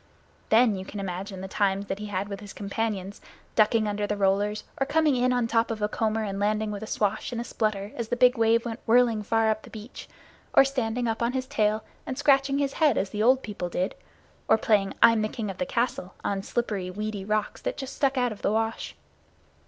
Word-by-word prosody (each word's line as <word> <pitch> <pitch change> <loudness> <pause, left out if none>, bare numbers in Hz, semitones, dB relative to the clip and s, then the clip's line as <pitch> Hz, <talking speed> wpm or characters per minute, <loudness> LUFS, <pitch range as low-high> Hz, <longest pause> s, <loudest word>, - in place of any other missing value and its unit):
Then 225 -1 +5
you 190 - -5
can 200 +2 -7
imagine 190 0 -5
the 190 - -5
times 200 0 0
that 195 0 -4
he 210 - -5
had 200 0 -2
with 200 -1 -6
his 205 -2 -10
companions, 200 -1 -3 0.3
ducking 215 0 +3
under 205 0 -1
the 210 - -2
rollers; 205 +2 +1 0.2
or 270 - +1
coming 310 -3 +3
in 250 0 +2
on 245 -1 +1
top 230 0 +1
of 225 -1 -3
a 210 - +1
comber 220 +1 -1
and 195 -2 -3
landing 210 +1 0
with 205 0 -5
a 220 - -6
swash 210 +2 -1
and 235 - -3
a - - -2
splutter 215 -3 -2
as 235 -2 -3
the 245 - -1
big 250 +1 +5
wave 230 +1 +3
went 235 -1 -4
whirling 230 -1 +4
far 225 +1 +2
up 215 0 -2
the - - -13
beach; 220 +2 -10 0.5
or - - +8
standing 245 -3 -1
up 225 0 -2
on 235 +1 +1
his 260 -1 -1
tail 215 -5 0 0.2
and 260 - -4
scratching 275 -1 +3
his 280 -1 0
head 295 -6 +5
as 190 - -1
the 210 - -2
old 255 +4 +4
people 200 -4 -4
did; 180 +2 -1 0.5
or - - +5
playing 210 -3 +1
"I'm 230 -1 +6
the 215 - 0
King 220 -5 -4
of 185 - -12
the 180 - -1
Castle" 235 -5 -2
on 195 -1 -1
slippery, 205 -4 -2
weedy 210 +1 -4
rocks 210 +1 -1
that - - -3
just 265 -1 -6
stuck 275 -2 +1
out 245 -1 +2
of 215 - -8
the - - +1
wash. 225 +1 -2
215 Hz, 230 wpm, -26 LUFS, 205-240 Hz, 0.5 s, or